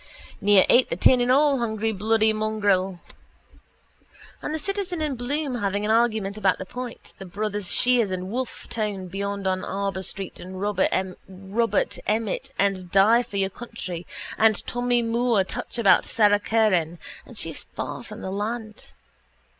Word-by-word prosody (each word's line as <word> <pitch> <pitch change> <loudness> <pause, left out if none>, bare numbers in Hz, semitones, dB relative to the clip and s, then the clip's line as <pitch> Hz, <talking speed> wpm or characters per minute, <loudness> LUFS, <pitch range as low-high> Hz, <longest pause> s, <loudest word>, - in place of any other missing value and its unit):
Near 205 -2 +6
ate 250 - +5
the - - -1
tin 250 -1 +5
and 245 +1 +2
all, 280 0 +4
hungry 220 -1 -1
bloody 220 +2 +2
mongrel. 205 -4 0 1.4
And - - -4
the 315 - -1
citizen 380 +1 -3
and 300 -3 -1
Bloom 275 +3 -2
having 200 +1 -1
an 215 - +1
argument 220 -3 +1
about 195 -3 +2
the 185 - -6
point, 245 +4 -8
the 195 - -7
brothers 205 +1 -3
Sheares 245 0 +3
and 185 +1 -4
Wolfe 255 +1 -4
Tone 205 -4 -3
beyond 200 +1 -3
on 185 0 0
Arbour 195 -1 -2
Hill 190 0 -5
and 190 0 -3
Robert 230 -3 +1
Emmet 215 -1 -1
and 195 -2 0
die 215 +5 +5
for 230 -4 -6
your 195 0 0
country, 185 -7 -6 0.3
the 220 -1 +4
Tommy 245 0 +1
Moore 230 -2 +2
touch 245 +6 -5
about 220 -5 +5
Sara 205 -2 +3
Curran 190 -7 +1 0.3
and - - -11
she's - - -4
far - - -4
from - - -10
the 190 - -4
land. 215 +2 -5
210 Hz, 155 wpm, -24 LUFS, 195-235 Hz, 1.4 s, Near